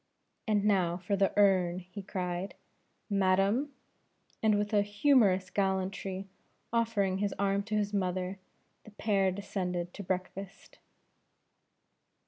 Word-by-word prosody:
"And 210 -2 +2
now 185 -4 +2
for 185 +2 -1
the 195 0 +2
urn," 185 -4 +4
he 185 +3 -8
cried, 185 -1 -4 0.5
"madam!" 200 +7 +2 0.7
and 215 -2 +3
with 205 +1 -2
a 205 - +5
humorous 205 -3 +3
gallantry, 190 0 -1 0.5
offering 210 -5 +1
his 205 -1 -1
arm 200 0 +1
to 215 0 -2
his 205 -1 0
mother, 185 -1 -1 0.4
the - - -13
pair 200 -2 +1
descended 180 -3 -3
to - - -7
breakfast. 190 +1 -5
195 Hz, 115 wpm, -31 LUFS, 185-205 Hz, 0.7 s, a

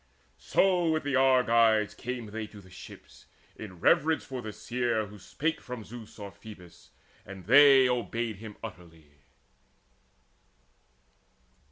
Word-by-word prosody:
So 180 -3 +2
with 160 0 0
the 140 -2 -1
Argives 115 -5 +3
came 125 -1 -6
they 110 +1 -6
to 105 - -14
the 95 -2 -17
ships - - -14 0.3
In 95 -5 -10
reverence 155 - +2
for 130 -2 -6
the 110 -2 -6
seer 120 -1 -2
who 105 0 -13
spake 160 - -3
from 125 -3 -8
Zeus 115 0 -12
Or 100 -2 -8
Phoebus, 100 -3 -14 0.3
and 95 -2 -11
they 135 +1 +7
obeyed 120 -3 -2
him 110 0 -10
utterly. 85 -7 -11
115 Hz, 130 wpm, -28 LUFS, 105-130 Hz, 0.3 s, they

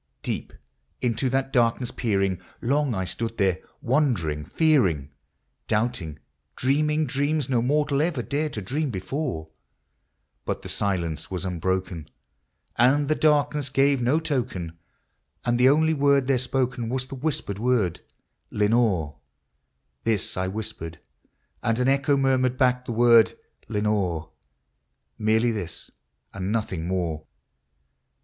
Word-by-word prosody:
Deep - - -3 0.5
into 125 +2 0
that 135 +1 -1
darkness 120 0 +2
peering, 95 -5 0 0.2
long 140 0 +1
I 95 - -1
stood 115 +4 -3
there, 95 -3 +2 0.2
wondering, 115 - +1
fearing, 95 - +2 0.6
Doubting, 105 -9 -1 0.4
dreaming 150 +4 +1
dreams 145 +1 0
no 125 -3 +2
mortal 145 +2 +1
ever 155 -6 0
dared 150 +4 -2
to 105 - -4
dream 145 +9 -1
before; 95 - -4 0.9
But - - -3
the - - -7
silence 90 -6 -2
was 95 -1 -4
unbroken, 90 -2 -2 0.7
and 140 +5 +4
the - - +4
darkness 150 -2 +2
gave 135 0 +3
no 125 +6 +3
token, 120 - -2 0.7
And 120 0 +1
the 130 +1 +6
only 160 +3 +4
word 140 -2 +3
there 130 -1 +2
spoken 125 -2 -1
was 130 +1 -1
the 130 - -10
whispered 130 -8 -2
word 115 -8 +1 0.3
" - - -50
Lenore! 105 - +2 0.4
" - - -50
This 110 -4 0
I 95 0 -1
whispered, 95 -5 -5 0.6
and 115 0 +1
an 125 - +2
echo 140 +1 +3
murmured 130 -2 +2
back 125 -1 +2
the - - -2
word 115 -1 +5 0.2
" - - -35
Lenore! 105 -7 -1 0.4
" - - -50
Merely 110 +2 +3
this, 90 -7 -5 0.4
and 100 0 -3
nothing 95 -7 -2
more. 85 -4 -2
120 Hz, 135 wpm, -25 LUFS, 95-135 Hz, 0.9 s, the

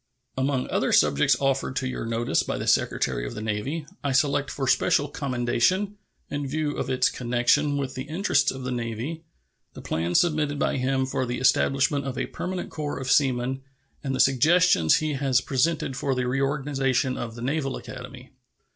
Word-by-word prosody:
Among 130 0 0
other - - +1
subjects 70 - +4
offered 135 -1 0
to 130 - -1
your 125 -2 -4
notice 115 +1 0
by - - -3
the - - -4
Secretary - - +1
of - - -5
the - - -5
Navy, 110 +9 -3 0.2
I 140 -2 0
select 140 0 +2
for 135 -2 -3
special 145 +2 +3
commendation, 140 - 0 0.3
in 145 -1 -3
view 150 +1 -2
of - - -3
its 130 -1 +2
connection 125 +4 +1
with 135 -2 -3
the 130 +1 -5
interests 170 +8 +1
of 130 -1 -5
the 130 - -3
Navy, 120 +6 -4 0.5
the - - -8
plan 85 +2 -2
submitted 150 -4 +2
by - - 0
him 130 +1 0
for 130 -1 -2
the 120 +1 -2
establishment 135 +2 +2
of 130 -2 -4
a - - -1
permanent 180 0 -5
corps 150 -2 -4
of 130 -1 -2
seamen 130 -1 +2 0.4
and 135 -2 -2
the - - -4
suggestions 135 - +4
he 155 -1 0
has 135 -2 +2
presented 135 +1 0
for 135 +1 -1
the 125 0 -1
reorganization 135 -1 0
of 115 -1 -5
the 115 - -7
Naval 135 0 -1
Academy. 125 +1 -10
135 Hz, 180 wpm, -25 LUFS, 125-145 Hz, 0.5 s, subjects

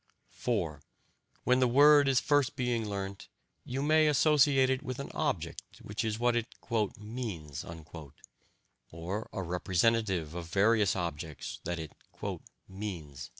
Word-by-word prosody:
(4) 85 - -2 0.6
When 125 +1 +3
the 130 - +4
word 145 +3 +7
is 135 -2 +4
being 130 -5 +1
first - - -5
learnt, 100 -1 -5 0.4
you 135 +2 -3
may 155 +1 +4
associate 145 -2 +4
it 130 - 0
with 130 -1 -5
an 140 - -6
object, - - -2 0.2
which 105 +3 -3
is 110 -1 -1
what 120 +1 +2
it 120 -1 0 0.5
"means," 105 - -6 1.3
or 90 +6 -5
a 95 - -4
representative 90 -1 +1
of 85 -1 -6
various 105 +2 +3
objects 80 -4 -5
that 85 +1 -2
it 80 -2 -6 0.8
"means." 85 -9 -6
110 Hz, 130 wpm, -31 LUFS, 90-130 Hz, 1.3 s, word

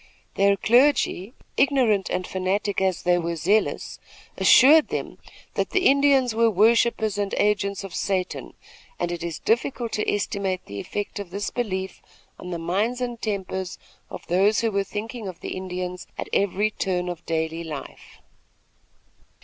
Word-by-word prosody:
Their 200 0 +3
clergy, 240 -2 +2 0.2
ignorant 235 -9 +3
and 185 - -2
fanatic 190 +2 -1
as 190 -2 0
they 175 0 +3
were 170 0 -2
zealous, 210 +7 0 0.4
assured 300 +4 +7
them - - -5 0.3
that - - -1
the 380 -1 +1
Indians 275 -3 +4
were 230 +1 +3
worshippers 220 0 +2
and 200 -1 -1
agents 200 -1 0
of 195 -3 -8
Satan; 185 -2 -2 0.4
and 175 - -2
it 175 - -4
is 170 -2 -4
difficult 235 0 -1
to 210 - 0
estimate 195 -2 -2
the 100 0 -7
effect 205 - -4
of 200 -3 -6
this 200 +3 -4
belief 190 -6 -3 0.4
on 180 - -8
the 175 - -3
minds 200 +9 -1
and 240 -2 -4
tempers 190 -3 -3 0.3
of - - -9
those 195 +5 +3
who 225 -1 0
were 200 -1 +1
thinking 215 +2 -6
of 185 -3 -8
the - - -5
Indians 180 -1 -5
at - - -5
every 200 +2 +1
turn 180 -3 -2
of 175 -1 -5
daily 160 0 -2
life. 155 -4 -9
200 Hz, 155 wpm, -24 LUFS, 180-225 Hz, 0.4 s, assured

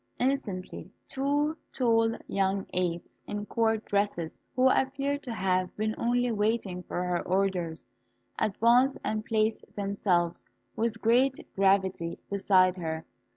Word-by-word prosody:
Instantly 245 -9 -2 0.2
two 290 +3 0 0.2
tall 230 -2 +2
young 195 0 0
apes, 175 -2 -2
in 205 0 -4
court 225 0 0
dresses, 200 -5 -1 0.2
who 255 +1 +5
appeared 275 +2 +1
to 255 - -6
have 185 -4 0
been 215 +1 0
only 245 +1 +1
waiting 210 -4 0
for 180 0 -3
her 180 -1 0
orders, 180 -3 -1 0.5
advanced 235 +6 +3
and 215 0 -1
placed 220 0 0
themselves 195 -4 0 0.3
with 225 0 -1
great 250 +4 +3
gravity 190 -3 +1
beside 190 -2 +3
her. 160 -2 -4
210 Hz, 120 wpm, -29 LUFS, 185-235 Hz, 0.5 s, who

